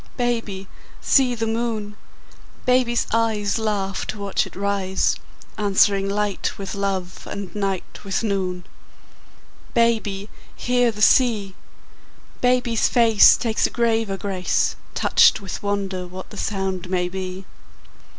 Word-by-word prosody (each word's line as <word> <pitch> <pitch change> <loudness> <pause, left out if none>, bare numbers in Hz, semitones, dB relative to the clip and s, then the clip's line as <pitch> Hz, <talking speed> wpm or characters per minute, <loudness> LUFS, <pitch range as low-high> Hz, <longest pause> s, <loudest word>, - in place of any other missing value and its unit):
Baby, 230 -6 -2 0.3
see 255 -3 +3
the 225 -1 -2
moon! 225 -2 -2 0.7
Baby's 250 -1 +2
eyes 220 -2 +1
Laugh 200 -3 -2
to 215 - -4
watch 200 -1 -1
it - - -14
rise, 195 -1 0 0.4
Answering 200 -1 +3
light 205 -1 -2
with 195 -1 -5
love 195 -3 -3
and 200 -2 -6
night 195 -3 -4
with 195 +2 -2
noon. 185 -4 -2 1.1
Baby, 220 -4 +1 0.3
hear 245 -1 +1
the 210 0 -2
sea! 220 -8 +3 0.9
Baby's 245 -2 +2
face 230 -4 +6
Takes 225 -3 +1
a - - -7
graver 225 -4 0
grace, 190 -1 0 0.2
Touched - - +5
with 195 -3 -6
wonder 195 -3 -2
what 185 +1 -9
the 210 - -10
sound 190 -3 -3
may 180 -1 0
be. 185 +1 -6
205 Hz, 120 wpm, -22 LUFS, 195-230 Hz, 1.1 s, face